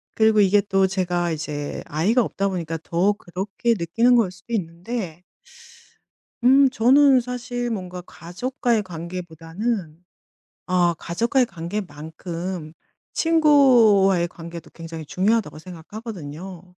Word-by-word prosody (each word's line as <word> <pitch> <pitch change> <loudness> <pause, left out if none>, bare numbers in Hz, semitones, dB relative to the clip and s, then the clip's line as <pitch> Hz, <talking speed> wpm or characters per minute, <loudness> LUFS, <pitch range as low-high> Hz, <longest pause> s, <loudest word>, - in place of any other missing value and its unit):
그리고 220 -1 +4
이게 205 +1 +5
또 195 -1 +2
제가 180 -2 -1
이제 150 -2 -4
아이가 195 - +2
없다 200 -1 -2
보니까 165 -3 -3
더 180 +5 +1
그렇게 200 +4 -2
느끼는 225 +9 +3
거일 225 -6 +3
수도 195 +6 -11
있는데 180 -1 -4 1.2
음 270 +1 +6
저는 265 +3 +5
사실 245 0 -4
뭔가 185 -4 -5
가족과의 225 - -2
관계보다는 170 +1 -5 0.6
아 175 -2 +2
'가족과의 235 - +1
관계만큼 170 -2 -6 0.4
친구와의 245 - +5
관계도 170 -1 -10
굉장히 165 -1 -8
중요하다.'고 200 +2 0
생각하거든요. 180 -1 -9
185 Hz, 280 characters per minute, -23 LUFS, 170-230 Hz, 1.2 s, 음